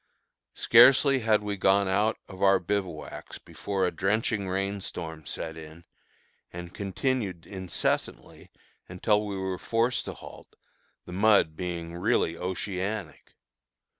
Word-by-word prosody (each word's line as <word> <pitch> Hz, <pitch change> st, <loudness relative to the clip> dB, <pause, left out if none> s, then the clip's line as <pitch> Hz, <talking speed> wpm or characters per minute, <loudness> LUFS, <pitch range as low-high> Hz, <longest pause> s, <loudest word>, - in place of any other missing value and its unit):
Scarcely 135 Hz, +3 st, +6 dB
had 110 Hz, -2 st, +2 dB
we 100 Hz, -1 st, -3 dB
gone 95 Hz, +1 st, +3 dB
out 105 Hz, +4 st, +1 dB
of 95 Hz, -1 st, -11 dB
our 95 Hz, 0 st, +6 dB
bivouacs 90 Hz, -3 st, -4 dB
before 100 Hz, -2 st, -3 dB
a 90 Hz, -, 0 dB
drenching 100 Hz, +2 st, 0 dB
rain 100 Hz, +1 st, -2 dB
storm 80 Hz, -4 st, -7 dB
set 80 Hz, -1 st, -5 dB
in, 80 Hz, +1 st, -11 dB, 0.7 s
and 85 Hz, 0 st, -8 dB
continued 100 Hz, -3 st, -2 dB
incessantly 95 Hz, -3 st, -3 dB, 0.4 s
until 105 Hz, +4 st, +1 dB
we 100 Hz, -2 st, -4 dB
were 95 Hz, -1 st, -3 dB
forced 115 Hz, +2 st, 0 dB
to -, -, -6 dB
halt, -, -, -13 dB, 0.5 s
the -, -, -10 dB
mud 100 Hz, -5 st, +4 dB
being 85 Hz, -1 st, -5 dB
really 90 Hz, -3 st, +1 dB
oceanic. 95 Hz, -1 st, -4 dB
95 Hz, 125 wpm, -27 LUFS, 90-105 Hz, 0.7 s, Scarcely